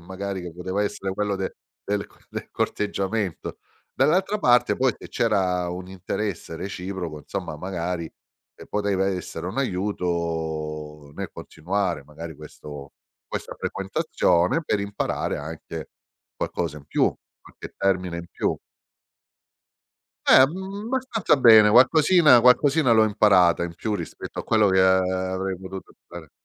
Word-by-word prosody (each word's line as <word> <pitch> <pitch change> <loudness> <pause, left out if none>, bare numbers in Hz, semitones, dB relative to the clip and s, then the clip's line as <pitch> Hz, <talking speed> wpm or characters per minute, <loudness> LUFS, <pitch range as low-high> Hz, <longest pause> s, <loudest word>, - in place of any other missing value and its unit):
magari 95 +2 -5
che 90 -2 -8
poteva 95 +3 -2
essere 100 -2 -3
quello 100 0 -1
del 95 0 -3 0.5
co - - -25
del - - -6
corteggiamento. 100 -2 -2 0.3
Dall'altra 185 +10 +2
parte 120 - +4
poi 130 -2 +2
se - - -12
c'era 95 -5 +1
un 90 +1 -6
interesse 95 -2 -4
reciproco 90 -4 -5
insomma 75 +1 -6
magari 90 -2 -3 0.5
ehm, - - -12
poteva 100 -2 0
essere 90 -3 -4
un 95 - -5
aiuto 80 - -3
nel - - -5
continuare 90 -2 -3
magari 80 +2 -9
questo 75 -1 -10 0.4
questa - - -5
frequentazione 95 - 0
per 105 - 0
imparare 100 0 -2
anche 80 +1 -7 0.4
qualcosa 80 -4 -3
in 70 - -18
più, - - +1 0.3
qualche - - -12
termine 95 -3 0
in 85 0 -7
più. - - -1 1.7
Eh, 130 - +8
mhmm, 190 +6 -6
abbastanza 240 - +1
bene. 110 -5 +8
Qualcosina 145 - +6
qualcosina 130 +2 +4
l'ho 110 -1 +6
imparata 95 -5 +4
in 85 -1 -6
più 105 +4 -3
rispetto - - -8
a - - -3
quello 110 -2 +3
che 95 0 +4
avrei 95 0 +1
potuto 95 0 -9
fare. 85 -4 -11
95 Hz, 130 wpm, -24 LUFS, 85-110 Hz, 1.7 s, Eh